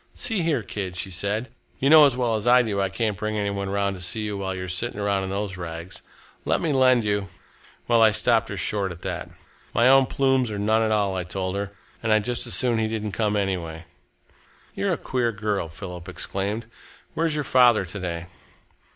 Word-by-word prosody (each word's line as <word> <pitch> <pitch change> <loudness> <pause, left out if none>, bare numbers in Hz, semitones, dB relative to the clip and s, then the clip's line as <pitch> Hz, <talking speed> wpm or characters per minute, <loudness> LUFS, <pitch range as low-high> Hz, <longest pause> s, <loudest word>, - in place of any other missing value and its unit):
'See 225 -6 0
here, 155 -8 0
kid,' 95 -3 -5
she 95 +1 -4
said, 100 +6 -2 0.3
'you 135 - 0
know 155 0 +9
as 130 -3 -1
well 120 -3 +1
as 110 +1 -3
I 125 +1 +6
do 100 -4 -1
I 95 - 0
can't 110 +1 -1
bring 110 +3 -3
any 100 -1 0
one 100 -1 -3
round 100 0 0
to 90 - -9
see 100 +5 -2
you 105 -1 -3
while 95 -1 -3
you 90 - -5
are - - -5
sitting 90 +3 -3
around 100 -1 0
in - - -5
those 100 -1 -3
rags. 85 0 -7 0.4
Let - - +1
me 160 -3 0
lend 130 -3 +4
you 100 -1 0 0.3
' - - -28
Well, 115 -1 +4
I 110 - +8
stopped 115 +1 +2
her 105 - -5
short 100 0 -1
at 85 - -10
that. - - -4 0.5
'My 120 +2 +5
own 135 0 +6
plumes 130 -3 +2
or 105 - -4
none 110 +2 +2
at 110 - +1
all,' 100 -3 +1
I 90 - -2
told 95 +2 -3
her, 100 0 -3 0.3
'and 110 - 0
I'd 110 -1 +4
just 120 +1 -1
as - - -1
soon 120 -3 +2
he 110 - +1
didn't 110 -1 -3
come, 105 0 0
anyway.'" 90 -5 -2 0.9
"You're - - -1
a - - -1
queer 120 -2 -1
girl," 105 -5 -2
Philip 90 +1 -8
exclaimed. 100 +4 -3 0.5
"Where's 160 -1 0
your 150 - -1
father 125 -6 +5
to 95 +4 -7
day?" 85 -2 -4
105 Hz, 225 wpm, -24 LUFS, 95-120 Hz, 0.9 s, know